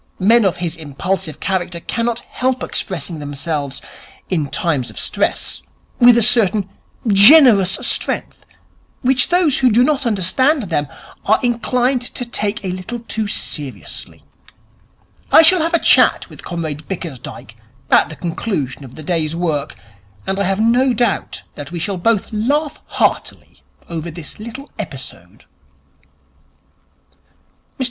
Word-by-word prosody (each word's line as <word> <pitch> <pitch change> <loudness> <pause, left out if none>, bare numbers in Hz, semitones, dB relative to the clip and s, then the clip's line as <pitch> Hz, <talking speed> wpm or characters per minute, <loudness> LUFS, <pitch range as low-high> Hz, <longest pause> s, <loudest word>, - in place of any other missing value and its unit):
Men 220 +3 +4
of 185 - +1
his 175 -1 -4
impulsive 160 +3 -4
character 180 -2 -2
cannot 230 +5 -2
help 255 0 -2
expressing 165 -4 -4
themselves 145 -1 -4 0.5
in 155 -6 0
times 145 -8 -1
of - - -13
stress - - -2 0.4
with 240 -1 +7
a 235 - +4
certain 210 -4 +3 0.4
generous 205 - +7
strength - - -1 0.6
which 255 0 +3
those 350 -5 +3
who 255 - +4
do 235 +3 +5
not 275 -2 +1
understand 240 - +2
them 160 -6 -1 0.4
are 215 - +4
inclined 245 +1 +1
to 245 0 -4
take 210 -2 -3
a 185 - -2
little 185 +6 -6
too 220 -2 -3
seriously. 145 -8 -4 1.1
I 325 - +8
shall 365 +1 +5
have 335 +2 +1
a - - +6
chat - - +4
with - - -13
Comrade 160 -3 -5
Bickersdyke 155 -10 -7 0.4
at - - +5
the 155 - -8
conclusion 160 - -3
of 130 -2 -12
the 155 - -9
day's 160 -1 -1
work, 160 -4 -2 0.5
and 190 +1 -2
I 200 - +1
have 195 +2 0
no 245 +3 +3
doubt 240 +2 -1
that 145 +1 -9
we 175 - -5
shall 190 +2 -3
both 220 +2 +1
laugh 285 +8 -1
heartily - - -2 0.3
over 170 0 -5
this 165 +1 -8
little 250 +6 -9
episode.' 130 - -9
195 Hz, 135 wpm, -18 LUFS, 165-240 Hz, 1.1 s, I